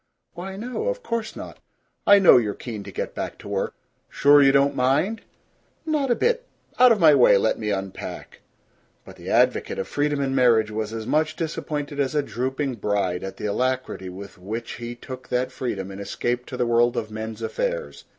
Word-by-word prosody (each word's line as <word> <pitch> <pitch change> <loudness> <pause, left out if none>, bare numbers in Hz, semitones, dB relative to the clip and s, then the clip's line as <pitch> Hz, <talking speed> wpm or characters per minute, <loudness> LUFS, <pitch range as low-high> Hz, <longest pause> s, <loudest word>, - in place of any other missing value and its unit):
"Why, 190 +2 -7
no. 250 - -4
Of - - -2
course 230 -2 -3
not. - - -9 0.5
I 205 - +9
know 195 -8 +7
you're 105 -4 0
keen 110 -4 -6
to - - -8
get - - -4
back - - -5
to - - -12
work." - - -2 0.3
"Sure 145 +1 +5
you 135 -1 +6
don't 140 +1 +3
mind?" 140 - +1 0.6
"Not 300 -4 0
a 240 - +3
bit. 485 - 0 0.3
Out 250 -1 +8
of 220 - +3
my 160 -4 +7
way. 125 -7 +6
Let 110 - +1
me 105 -1 -2
unpack." 95 -1 -5 0.6
But - - -12
the - - -8
advocate - - +2
of 95 - -3
freedom 145 0 0
in 135 -1 -1
marriage 115 -5 +3
was 110 0 -3
as 110 -1 -5
much 155 +3 +1
disappointed 150 -3 -4
as 140 +1 0
a 150 - +2
drooping 130 +2 -3
bride 100 -4 -1
at 95 - -6
the - - -5
alacrity 125 -3 -2
with 100 +1 -10
which 110 +5 -5
he 120 0 -6
took 130 +1 -9
that 125 +1 -1
freedom 100 -6 -4
and 95 +1 -8
escaped 120 +4 -3
to 125 - -6
the 125 - +1
world 120 0 +2
of 110 -1 -3
men's 110 +1 -6
affairs. - - -3
130 Hz, 200 wpm, -24 LUFS, 110-155 Hz, 0.6 s, I